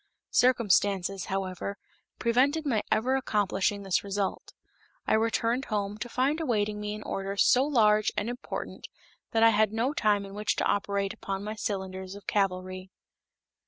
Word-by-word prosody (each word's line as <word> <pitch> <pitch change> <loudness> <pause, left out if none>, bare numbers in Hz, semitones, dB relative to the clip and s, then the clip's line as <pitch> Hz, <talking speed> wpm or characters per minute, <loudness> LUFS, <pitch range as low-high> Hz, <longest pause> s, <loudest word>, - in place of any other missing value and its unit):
Circumstances, 200 -6 +2
however, 195 +1 -3 0.4
prevented 270 +7 +2
my 230 -7 +1
ever 255 +4 +2
accomplishing 205 -5 0
this 190 -3 +1
result. 200 -1 -3 0.5
I - - +1
returned 230 +3 +1
home, 205 0 -2
to 240 - -5
find 275 +7 0
awaiting 210 -7 0
me 210 0 -3
an 215 - -8
order 195 +1 -4
so 255 +5 +5
large 215 -7 +3
and 210 - 0
important 245 +2 -6 0.4
that 225 0 +2
I 230 - +8
had 215 -1 +3
no 235 +6 0
time 205 -6 +2
in 195 - -10
which 210 +1 -1
to - - -1
operate 200 -1 0
upon 195 0 -5
my 210 +1 -4
cylinders 190 -2 -4
of 200 -2 -12
cavalry. 185 -2 -1
210 Hz, 155 wpm, -28 LUFS, 195-230 Hz, 0.5 s, I